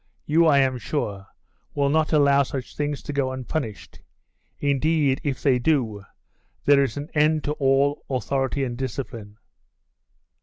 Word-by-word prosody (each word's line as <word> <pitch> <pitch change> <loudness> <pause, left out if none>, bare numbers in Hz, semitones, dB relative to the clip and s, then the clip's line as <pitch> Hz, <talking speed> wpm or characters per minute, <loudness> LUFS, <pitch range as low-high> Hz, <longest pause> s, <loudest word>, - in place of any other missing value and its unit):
You, 165 +2 +4
I 145 -3 +5
am 130 -2 +2
sure, 100 -9 -4 0.5
will 140 -1 +2
not 155 +1 +1
allow 140 -2 +4
such 130 -1 -5
things 145 -1 -3
to 145 - -5
go 135 -2 0
unpunished; 130 -3 -5 0.6
indeed, 145 0 +1
if 140 -4 -3
they 130 -4 +3
do, 120 -8 0 0.6
there 140 -1 +6
is 135 - -3
an 145 +3 -6
end 155 0 +2
to 145 - -1
all 140 0 +1
authority 135 0 -1
and 120 -2 -3
discipline. 120 -4 -6
140 Hz, 145 wpm, -24 LUFS, 130-145 Hz, 0.6 s, there